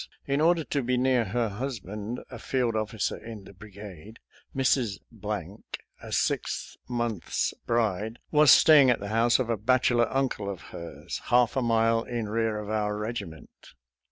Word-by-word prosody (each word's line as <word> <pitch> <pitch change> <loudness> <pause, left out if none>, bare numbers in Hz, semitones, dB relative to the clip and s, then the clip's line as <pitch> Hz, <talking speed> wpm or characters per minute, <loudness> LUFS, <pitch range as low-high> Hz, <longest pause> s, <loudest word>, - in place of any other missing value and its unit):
In 140 +1 0
order 165 0 +3
to 145 -1 -1
be 125 0 0
near 125 -2 +2
her 115 +4 0
husband, 105 -1 -5
a 120 - -8
field 125 -3 -1
officer 110 -1 -2
in 110 -3 -9
the - - -13
bri 105 +3 -13
gade, 100 +1 -11 0.4
Mrs., 130 -6 +1 1.0
a - - -9
six - - -1
months' 120 -6 -1
bride, 110 -1 0
was 150 -1 +5
stay 155 +2 +8
ing 130 - +5
at 125 - +3
the 100 - -6
house 115 +2 +3
of 120 -3 -1
a 115 - 0
bachelor 120 +1 +2
uncle 130 -7 -1
of 95 -4 -6
hers, 85 0 -7
half 120 -1 +3
a 135 - +1
mile 115 -1 +2
in 120 -2 -4
rear 110 0 0
of 105 -1 -6
our 105 -1 -1
regiment. 105 -7 -6
115 Hz, 165 wpm, -27 LUFS, 105-125 Hz, 1.0 s, stay